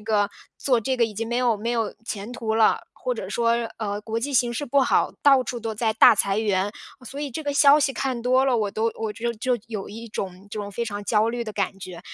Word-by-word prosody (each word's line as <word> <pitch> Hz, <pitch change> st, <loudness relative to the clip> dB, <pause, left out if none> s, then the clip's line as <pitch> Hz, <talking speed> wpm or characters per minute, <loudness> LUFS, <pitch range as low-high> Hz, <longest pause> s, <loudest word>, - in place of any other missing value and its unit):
个 210 Hz, -2 st, +1 dB, 0.3 s
做 250 Hz, -4 st, +1 dB
这 260 Hz, +3 st, -1 dB
个 235 Hz, -, +3 dB
已 220 Hz, -, -4 dB
经 225 Hz, +2 st, -3 dB
没 240 Hz, -, -1 dB
有 245 Hz, -3 st, +2 dB
没 230 Hz, +3 st, -3 dB
有 230 Hz, -2 st, -1 dB
前 210 Hz, 0 st, -5 dB
途 225 Hz, -3 st, -2 dB
了， 220 Hz, -1 st, +4 dB
或 -, -, -3 dB
者 -, -, -6 dB
说， 235 Hz, 0 st, +1 dB, 0.2 s
呃， 205 Hz, -2 st, -3 dB
国 220 Hz, +1 st, -3 dB
际 285 Hz, +4 st, -3 dB
形 240 Hz, -2 st, +2 dB
势 290 Hz, -, -2 dB
不 280 Hz, +3 st, +3 dB
好， -, -, +2 dB
到 275 Hz, -3 st, +6 dB
处 240 Hz, 0 st, -5 dB
都 225 Hz, -1 st, -4 dB
在 220 Hz, 0 st, 0 dB
大 220 Hz, -, +7 dB
裁 200 Hz, 0 st, +1 dB
员。 205 Hz, -2 st, +1 dB, 0.3 s
所 275 Hz, +4 st, -7 dB
以 295 Hz, -, -2 dB
这 310 Hz, +6 st, -5 dB
个 290 Hz, -1 st, -2 dB
消 285 Hz, +1 st, +6 dB
息 275 Hz, -1 st, +1 dB
看 255 Hz, -4 st, -2 dB
多 255 Hz, +1 st, +3 dB
了， 260 Hz, -3 st, +2 dB
我 210 Hz, -2 st, 0 dB
都 220 Hz, +3 st, -1 dB
我 220 Hz, -1 st, -3 dB
就 235 Hz, +2 st, -3 dB
就 245 Hz, +2 st, -1 dB
有 215 Hz, -4 st, -5 dB
一 225 Hz, +3 st, -8 dB
种 190 Hz, -1 st, -6 dB
这 210 Hz, -, -4 dB
种 205 Hz, -, -6 dB
非 235 Hz, +4 st, -3 dB
常 205 Hz, -2 st, -5 dB
焦 215 Hz, +1 st, +2 dB
虑 240 Hz, 0 st, -2 dB
的 215 Hz, -2 st, -6 dB
感 200 Hz, -1 st, -2 dB
觉。 180 Hz, -2 st, -8 dB
230 Hz, 275 characters per minute, -24 LUFS, 210-250 Hz, 0.3 s, 大